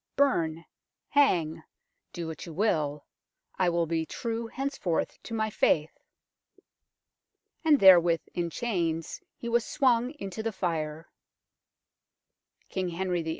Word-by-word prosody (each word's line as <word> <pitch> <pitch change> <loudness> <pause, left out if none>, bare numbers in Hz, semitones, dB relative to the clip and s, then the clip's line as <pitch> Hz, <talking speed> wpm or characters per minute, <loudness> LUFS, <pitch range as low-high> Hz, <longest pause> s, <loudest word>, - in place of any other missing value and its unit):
Burn 165 - +1 0.5
^hang 170 - +3 0.5
do 170 - -5
what 160 +2 -7
you 165 - -8
will 155 -7 0 0.5
I 185 -2 +4
will 170 -1 +1
be 165 0 -1
true 230 +6 -4
henceforth 265 -10 -2
to 230 - -6
my 220 -1 -1
faith." 155 -5 +2 1.7
And 305 -3 +5
therewith, 175 -3 +7
in 175 -1 -1
chains, 165 -6 -2 0.2
he 235 - -7
was 235 0 +2
swung 250 -1 +2
into 200 -5 -6
the 225 0 -2
fire. 160 -4 -3 1.6
King 185 -2 -2
Henry 180 0 -1
VIII. 160 - -5
180 Hz, 120 wpm, -28 LUFS, 165-230 Hz, 1.7 s, therewith